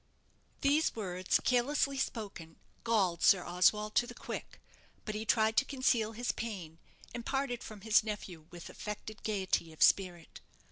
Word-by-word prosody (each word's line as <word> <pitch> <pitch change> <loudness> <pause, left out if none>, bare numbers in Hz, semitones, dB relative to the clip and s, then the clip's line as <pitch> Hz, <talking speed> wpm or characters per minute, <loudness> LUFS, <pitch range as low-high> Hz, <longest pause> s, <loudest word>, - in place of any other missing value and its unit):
These 290 +3 +2
words, 185 -4 0
carelessly 275 +2 +1
spoken, 200 -10 -4 0.3
galled 195 -7 +1
Sir 190 -3 +5
Oswald 210 +4 +2
to 240 - +3
the 245 - -9
quick; - - -7 0.5
but 215 - -3
he 215 +1 -4
tried 220 0 +3
to - - +6
conceal 250 -5 +1
his 240 +2 -1
pain, 180 -8 -6 0.3
and 240 - -5
parted 270 -2 -2
from 215 -2 -9
his 215 +1 +4
nephew 190 -7 -6
with 175 -1 -10
affected 210 +1 -7
gaiety 190 -5 -1
of 155 - +1
spirit. 180 -4 +2
215 Hz, 150 wpm, -32 LUFS, 185-240 Hz, 0.5 s, to